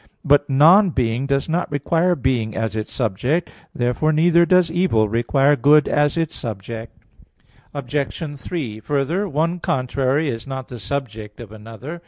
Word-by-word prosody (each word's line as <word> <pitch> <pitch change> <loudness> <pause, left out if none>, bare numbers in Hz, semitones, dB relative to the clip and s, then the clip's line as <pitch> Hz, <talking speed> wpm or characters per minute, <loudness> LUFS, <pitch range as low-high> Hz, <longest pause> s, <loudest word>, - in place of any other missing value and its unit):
But 145 0 +3
"non 165 +9 +6
being" 125 -2 -1
does 140 0 0
not 170 +2 -1
require 165 +5 +1
being 125 -6 -1
as 110 -1 -2
its 110 -1 -4
subject. 125 - -1 0.2
Therefore, 125 +6 0
neither 170 +2 +3
does 180 -2 +3
evil 170 -12 +1
require 135 +6 +2
good 145 +3 +4
as 145 +1 +1
its 165 -2 -1
subject. 115 +1 -7 0.8
Obj. 145 +2 -4
3: 125 -12 -5
Further, 145 - -1
one 165 +4 -1
contrary 135 +2 -1
is 115 -2 -4
not 130 -1 -6
the 125 - -8
subject 110 -3 -5
of 115 -4 -10
another. 115 +9 -9
140 Hz, 150 wpm, -20 LUFS, 115-160 Hz, 0.8 s, non